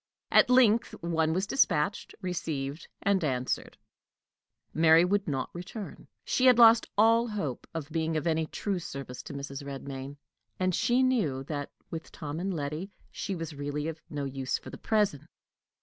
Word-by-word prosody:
At - - +6
length 240 -2 +4
one 160 -2 +1
was 185 +4 0
dispatched, 200 - +1
received, 155 -5 -3 0.2
and 195 -2 +2
answered: 130 -4 -2 1.0
Mary 160 +1 +6
would 200 +2 +1
not 135 -4 -2
return. 185 +4 -8 0.2
She 260 - +3
had 250 -2 +7
lost 230 -1 +7
all 230 +2 +5
hope 180 - -4
of 160 -2 -6
being 160 0 0
of 155 - -2
any 160 -1 +1
true 195 +4 -2
service 135 -6 -7
to - - -9
Mrs. 140 0 -6
Redmain, 140 0 -7 0.4
and 185 0 +1
she 245 +8 +3
knew 180 - +1
that, 145 0 -4 0.2
with 165 -1 -6
Tom 150 +1 -5
and 195 +2 -2
Letty, 155 +3 -3 0.2
she 195 - -4
was 165 -2 -5
really 145 +1 -3
of 160 -1 -5
use 135 -3 -2
for - - -11
the - - -8
present. 205 -10 +1
160 Hz, 160 wpm, -29 LUFS, 145-200 Hz, 1.0 s, had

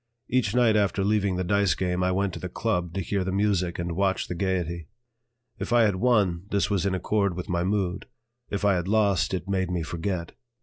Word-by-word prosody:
Each 120 -4 +1
night 120 -3 +4
after 100 -1 +1
leaving 100 -2 +1
the 95 - -1
dice 100 -1 +2
game 90 -1 -1
I 90 0 +2
went 95 0 0
to - - -6
the 90 - -5
"Club" 90 -4 -2
to 95 - -1
hear 95 +2 -1
the 95 - -2
music 95 -3 0
and 85 0 -3
watch 95 0 0
the - - -3
gaiety. 85 -3 -2 0.7
If - - -4
I 120 -1 +5
had 100 -4 +2
won, 100 -6 +2
this 100 0 0
was 100 -1 +1
in 95 - 0
accord 100 0 0
with 90 - -6
my 85 -1 0
mood; 95 -1 -1 0.4
if 100 0 -2
I 100 - +5
had 90 -1 -1
lost, 100 -2 +2
it 95 -1 -3
made 95 -2 0
me 90 -2 -1
forget. 85 +1 -3
95 Hz, 220 wpm, -26 LUFS, 90-100 Hz, 0.7 s, I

